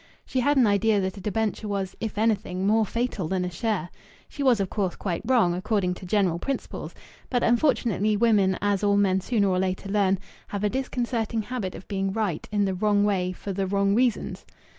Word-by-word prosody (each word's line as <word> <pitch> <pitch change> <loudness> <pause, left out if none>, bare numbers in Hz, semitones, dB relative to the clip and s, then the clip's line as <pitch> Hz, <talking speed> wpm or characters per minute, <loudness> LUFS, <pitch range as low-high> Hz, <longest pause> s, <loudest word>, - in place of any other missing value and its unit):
She 260 - -1
had 285 +3 +2
an 255 - +6
idea 205 +1 +3
that 190 0 -2
a - - -8
debenture 215 +2 -2
was, 195 -2 -3
if 220 -2 -4
anything, 200 -4 0
more 215 +1 +3
fatal 230 -7 -2
than 185 +1 -1
a 180 - -4
share. 185 -2 -2 0.4
She 285 - -8
was, 255 -5 +4
of 195 - 0
course, 190 -2 -2
quite 175 -4 -3
wrong, 225 -8 +3
according 185 0 0
to 180 0 -10
general 185 -4 +1
principles; 275 +8 -4 0.3
but, 245 -1 +1
unfortunately, 230 - +2
women, 205 -4 +3
as 205 -1 +1
all 200 0 +3
men 190 -2 +2
sooner 205 0 +1
or 185 -1 +1
later 185 +1 -2
learn, 195 -1 +2 0.3
have 205 0 -4
a 210 - +3
disconcerting 240 -4 -2
habit 220 -6 -4
of 185 - -11
being 195 -1 -1
right 200 -8 -2
in 205 -1 +2
the 190 - 0
wrong 205 +2 +2
way 190 -3 +1
for 195 +2 -6
the 195 0 -1
wrong 200 +1 +2
reasons. 245 +1 0
205 Hz, 205 wpm, -25 LUFS, 190-225 Hz, 0.4 s, an